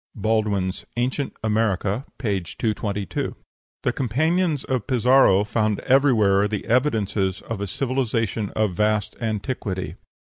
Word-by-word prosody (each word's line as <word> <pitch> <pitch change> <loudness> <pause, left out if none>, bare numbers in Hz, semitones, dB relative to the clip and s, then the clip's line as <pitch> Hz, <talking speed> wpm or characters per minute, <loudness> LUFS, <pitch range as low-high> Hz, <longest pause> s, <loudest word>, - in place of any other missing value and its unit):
(Baldwin's 105 -3 0
"Ancient 130 +3 -1
America," 105 +1 0
p. 105 -6 0
222.) 105 +2 -3 0.5
The - - +1
companions 155 +5 +1
of 130 -5 -2
Pizarro 125 -5 +5
found 105 0 0
everywhere 110 -7 +4
the 105 -1 -4
evidences 110 -7 +1
of 110 -3 -5
a 100 - -2
civilization 115 -3 -1
of 110 -3 +1
vast 105 +1 0
antiquity. 105 -3 -3
110 Hz, 110 wpm, -23 LUFS, 100-125 Hz, 0.5 s, Pizarro